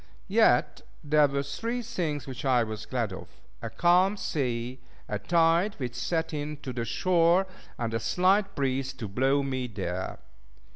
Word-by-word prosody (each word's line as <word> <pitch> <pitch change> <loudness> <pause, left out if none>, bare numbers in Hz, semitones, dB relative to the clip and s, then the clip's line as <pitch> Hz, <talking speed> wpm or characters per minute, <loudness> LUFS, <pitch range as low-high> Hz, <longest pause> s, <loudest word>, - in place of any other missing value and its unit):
Yet - - +4 0.2
there 150 0 +4
were 140 0 -1
three 230 - -3
things 165 - -3
which 135 +2 -7
I 125 -3 +3
was 110 -1 -6
glad 115 -6 -2
of; - - -8 0.3
a - - -4
calm 180 +4 +3
sea, 125 -6 -2 0.3
a 105 - -3
tide 170 - +2
which 125 -3 -4
set 160 +7 -2
in 150 0 -4
to 130 - -4
the 120 -1 -3
shore, 170 - +3 0.3
and 115 -1 -3
a 115 - 0
slight 190 - +2
breeze 135 -1 -1
to 125 -5 -6
blow 135 +7 +1
me 130 -2 -2
there. 95 -4 -4
140 Hz, 160 wpm, -28 LUFS, 120-170 Hz, 0.3 s, Yet